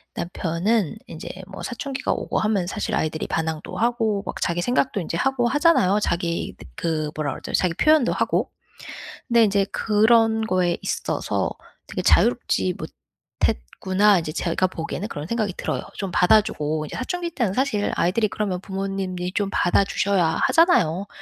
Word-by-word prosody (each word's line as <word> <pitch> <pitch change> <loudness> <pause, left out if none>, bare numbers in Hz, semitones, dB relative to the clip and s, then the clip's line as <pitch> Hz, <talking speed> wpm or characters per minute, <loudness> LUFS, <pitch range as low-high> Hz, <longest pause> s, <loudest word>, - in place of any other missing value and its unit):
남편은 175 +3 -1
인제 160 - -8 0.2
뭐 195 -1 -9
사춘기가 265 +2 -3
오고 - - -2
하면 210 -4 +1
사실 215 +2 -2
아이들이 155 -4 -2
반항도 160 -1 -3
하고 225 -4 +1
막 - - -6
자기 175 0 0
생각도 245 +2 +1
인제 165 0 -3
하고 265 +2 +1
하잖아요. 275 - +3
자기 170 -2 -2
느 - - -11
그 155 -2 -2
뭐라 150 -2 -2
그러죠? - - -8
자기 180 -3 +2
표현도 305 - +4
하고. - - 0 0.8
근데 235 -1 +5
인제 200 -1 +2
그런 220 +1 +3
거에 180 -3 +1
있어서 - - -1 0.4
되게 - - -4
'자유롭지 95 -1 +2
못했구나.' 190 - 0
인제 155 -1 -5
제가 180 +2 0
보기에는 175 +3 -5
그런 145 -6 -5
생각이 215 -2 -1
들어요. - - -2
좀 195 -2 -4
받아 180 +5 +5
주고 155 -5 -3
이제 - - -8
사춘기 340 +6 -3
때는 230 -10 0
사실 250 -4 0
아이들이 210 +5 +2
그러면 190 -4 -2
부모님이 190 -2 -4
좀 200 -1 0
받아 175 +3 +3
주셔야 195 -3 +1 0.2
하잖아요. 200 - +3
195 Hz, 360 characters per minute, -23 LUFS, 170-225 Hz, 0.8 s, 근데